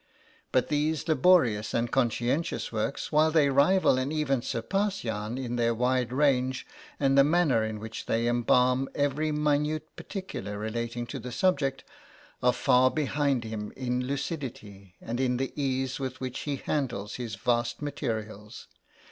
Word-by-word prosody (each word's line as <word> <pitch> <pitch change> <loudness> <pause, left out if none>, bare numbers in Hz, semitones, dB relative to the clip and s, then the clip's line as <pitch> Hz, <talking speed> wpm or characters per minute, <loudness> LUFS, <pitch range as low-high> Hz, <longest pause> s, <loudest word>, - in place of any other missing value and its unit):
But 130 - +2
these 150 +1 0
laborious 155 - +3
and 115 0 0
conscientious 125 +5 0
works, 110 +4 -2
while 155 +1 +4
they 155 -3 +4
rival 140 +1 +4
and 130 +3 -2
even 145 -5 0
surpass 195 - -1
Jahn 110 +1 -3
in 120 -2 -3
their 115 -1 +2
wide 125 +1 +1
range 130 -2 +1 0.3
and 135 -1 +3
the 140 - +7
manner 150 -6 +3
in 110 -1 -3
which 110 +1 -7
they 115 +1 +1
embalm 125 +2 +2
every 145 +2 0
minute 150 +1 0
particular 105 - -6
relating 115 +3 -3
to - - -6
the 125 - -7
subject, 140 -4 +1 0.6
are 125 - +4
far 125 +1 +4
behind 140 -3 0
him 110 -2 -5
in 125 -1 -1
lucidity, 130 - -5
and 120 +2 -4
in 125 -2 +1
the 135 +1 -3
ease 130 -2 -1
with 130 -1 -4
which 130 -1 -4
he 140 - 0
handles 125 -8 -3
his 120 -3 -5
vast 120 -1 0
materials. 110 -7 -5
130 Hz, 150 wpm, -28 LUFS, 120-145 Hz, 0.6 s, the